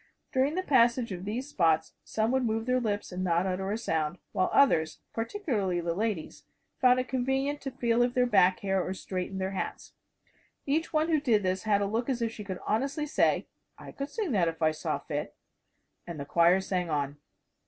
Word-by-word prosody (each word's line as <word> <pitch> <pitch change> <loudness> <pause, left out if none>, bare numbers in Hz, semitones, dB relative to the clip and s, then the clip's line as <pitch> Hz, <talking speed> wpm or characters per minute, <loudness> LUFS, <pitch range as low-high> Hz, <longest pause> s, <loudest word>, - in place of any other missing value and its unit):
During 270 +3 +2
the 370 - -1
passage 240 - +3
of 185 0 -5
these 240 +6 -3
spots 160 - +1
some 220 +1 0
would 260 0 +2
move 225 -1 -1
their 255 0 +2
lips 205 -5 -2
and 180 +1 -3
not 175 0 +2
utter 190 +1 -2
a 215 - 0
sound, 160 -6 -1
while 185 -3 +1
others 160 - +3 0.2
particularly 225 - -1
the 170 0 -1
ladies 205 -3 -3 0.4
found 255 0 +5
it 255 - -2
convenient 265 +3 -1
to 275 - -4
feel 240 -2 +1
of 245 0 +1
their 250 -1 +4
back 185 -6 +4
hair 195 -1 +1
or 190 - -4
straighten 185 0 -4
their 190 0 -2
hats. 195 - -5 0.7
Each 310 +4 0
one 310 +1 +1
who 315 -2 +3
did 225 -7 +2
this 185 +2 -1
had 205 -2 +3
a - - +1
look 225 +5 -1
as 255 -2 0
if 230 -1 -1
she 215 - -8
could 190 -2 -5
honestly 275 +7 0
say, 300 - +2 0.3
"I - - -10
could 275 +1 -5
sing 410 -1 -3
that 185 -7 +2
if 165 0 -3
I 155 -1 +3
saw 155 - -2
fit" - - -5 0.7
and 170 -3 -6
the 140 - -4
choir 170 +5 +4
sang 180 -2 -2
on. 145 -2 -1
215 Hz, 205 wpm, -29 LUFS, 185-255 Hz, 0.7 s, found